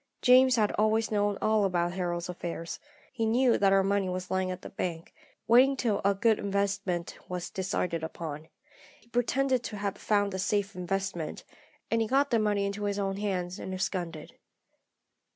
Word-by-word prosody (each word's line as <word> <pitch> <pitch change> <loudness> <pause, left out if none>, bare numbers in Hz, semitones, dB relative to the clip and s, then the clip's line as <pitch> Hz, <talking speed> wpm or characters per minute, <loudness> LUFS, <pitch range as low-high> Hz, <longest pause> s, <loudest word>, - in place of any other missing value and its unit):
"James 255 0 +6
had 215 -3 +2
always 220 +1 +2
known 205 -1 +1
all 215 -1 +3
about 175 -2 0
Harold's 175 -2 -2
affairs. 170 -1 -5 0.3
He 235 -3 -2
knew 245 +2 +3
that 195 -1 +4
our 195 0 +4
money 195 -1 +1
was 180 0 -4
lying 185 0 0
at 185 0 -6
the - - -8
bank, 170 -3 -4 0.3
waiting 260 +4 +6
till 220 -6 0
a 200 0 +3
good 220 +2 +3
investment 200 -3 -2
was 180 -1 -4
decided 180 -4 -2
upon. 160 -1 -6 0.5
He 235 - -26
pretended 255 +2 +1
to 210 - -5
have 200 -1 -3
found 205 -2 +1
a 190 - -3
safe 200 0 0
investment, 180 -2 -3 0.5
and 230 0 +2
he 225 - 0
got 275 +3 +2
the 230 - +3
money 205 -2 +1
into 200 +1 -3
his 200 0 -1
own 195 -1 -1
hands 185 -3 -2
and 185 - -5
absconded. 175 -4 -4
200 Hz, 175 wpm, -29 LUFS, 180-215 Hz, 0.5 s, James